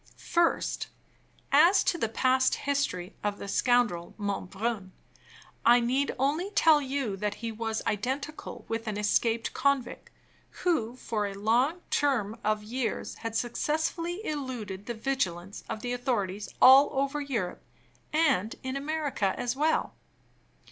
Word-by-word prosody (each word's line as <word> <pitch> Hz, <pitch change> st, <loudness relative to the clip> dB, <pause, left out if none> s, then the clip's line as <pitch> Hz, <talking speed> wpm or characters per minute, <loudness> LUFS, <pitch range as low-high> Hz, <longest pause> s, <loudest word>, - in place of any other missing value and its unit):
First, 340 Hz, -1 st, 0 dB, 0.6 s
as 375 Hz, +3 st, +6 dB
to -, -, +1 dB
the 230 Hz, -10 st, -1 dB
past 260 Hz, +3 st, +2 dB
history 245 Hz, -11 st, -2 dB
of 205 Hz, -1 st, -1 dB
the -, -, -7 dB
scoundrel 220 Hz, -6 st, +1 dB
Monbrun, 200 Hz, 0 st, -3 dB, 0.7 s
I 240 Hz, +1 st, +7 dB
need 255 Hz, +4 st, 0 dB
only 295 Hz, +9 st, 0 dB
tell 320 Hz, -7 st, +5 dB
you 265 Hz, -6 st, -2 dB
that 210 Hz, +1 st, -2 dB
he 230 Hz, 0 st, -5 dB
was 225 Hz, 0 st, -3 dB
identical 265 Hz, +8 st, -3 dB
with 225 Hz, 0 st, -3 dB
an 210 Hz, -1 st, -2 dB
escaped 225 Hz, +2 st, +1 dB
convict, 280 Hz, -2 st, 0 dB, 0.6 s
who, 245 Hz, -10 st, +1 dB
for 215 Hz, -5 st, -2 dB
a 200 Hz, -, -6 dB
long 245 Hz, -, +1 dB
term 235 Hz, -7 st, +1 dB
of 215 Hz, 0 st, 0 dB
years, 240 Hz, +3 st, -3 dB
had 225 Hz, -1 st, -5 dB
successfully 320 Hz, -, -1 dB
eluded 245 Hz, -10 st, -4 dB
the 235 Hz, -, -3 dB
vigilance 205 Hz, -7 st, -2 dB
of 215 Hz, -, -4 dB
the 245 Hz, 0 st, -2 dB
authorities 210 Hz, -6 st, -2 dB
all 265 Hz, +2 st, +8 dB
over 275 Hz, +2 st, 0 dB
Europe, 230 Hz, -11 st, -3 dB, 0.5 s
and 270 Hz, -, +2 dB
in 260 Hz, +1 st, -3 dB
America 280 Hz, -8 st, -1 dB
as 245 Hz, 0 st, -1 dB
well. 310 Hz, +3 st, +1 dB
245 Hz, 135 wpm, -28 LUFS, 210-280 Hz, 0.7 s, all